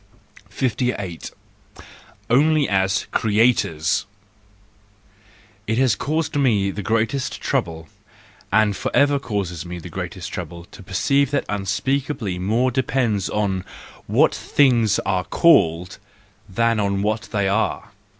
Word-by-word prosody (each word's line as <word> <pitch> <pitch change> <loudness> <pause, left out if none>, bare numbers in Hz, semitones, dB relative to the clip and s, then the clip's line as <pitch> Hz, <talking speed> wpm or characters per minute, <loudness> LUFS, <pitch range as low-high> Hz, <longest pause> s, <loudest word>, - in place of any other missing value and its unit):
S 130 -4 +1
8. 100 -9 -3 1.0
Only 150 +4 +3
as 95 0 +1
Creators 105 -9 +1 1.6
!—It 110 +1 0
has 130 -4 +3
caused 155 +5 -2
me 110 -9 +2
the 105 - -5
greatest 115 +6 -1
trouble, 80 -1 -2 0.6
and 110 -2 +3
for - - -3
ever 145 0 +4
causes 100 -9 -3
me 90 0 -7
the 85 - -9
greatest - - -6
trouble, 85 0 -7
to - - -12
perceive 130 +9 +1
that 145 0 -1
unspeakably 105 +1 -2
more 115 +7 +1
depends 120 -5 0
upon 100 -3 -1 0.4
what - - +3
things 120 -7 +2
are 90 -1 0
called, 90 - +3 0.5
than 115 +3 +1
on 100 -1 0
what 110 +2 -2
they 100 -3 0
are. 100 +3 -1
105 Hz, 120 wpm, -21 LUFS, 95-130 Hz, 1.6 s, ever